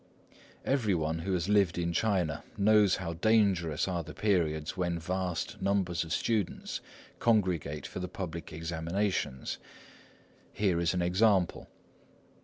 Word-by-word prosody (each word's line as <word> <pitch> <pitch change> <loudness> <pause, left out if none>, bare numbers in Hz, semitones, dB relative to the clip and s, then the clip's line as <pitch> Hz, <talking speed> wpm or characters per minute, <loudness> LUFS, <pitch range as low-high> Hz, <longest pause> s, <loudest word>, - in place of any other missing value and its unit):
Every 120 -8 +2
one 80 0 -1
who 95 +3 -2
has 90 -1 0
lived 100 -5 +3
in 85 -1 -1
China 90 -6 0
knows 105 -1 +5
how 85 -3 -4
dangerous 90 -5 +2
are 90 -2 -1
the 80 - -10
periods 80 -7 0
when 90 -2 -1
vast 90 0 -3
numbers 95 -3 +1
of 80 - -9
students 105 0 -1 0.4
congregate 90 -10 +1
for - - -6
the 90 - -3
public 85 -3 -6
examinations. 80 -2 -2 0.9
Here 95 -5 +1
is 85 +1 +1
an 90 - +1
example. 95 0 +2
90 Hz, 130 wpm, -30 LUFS, 85-100 Hz, 0.9 s, knows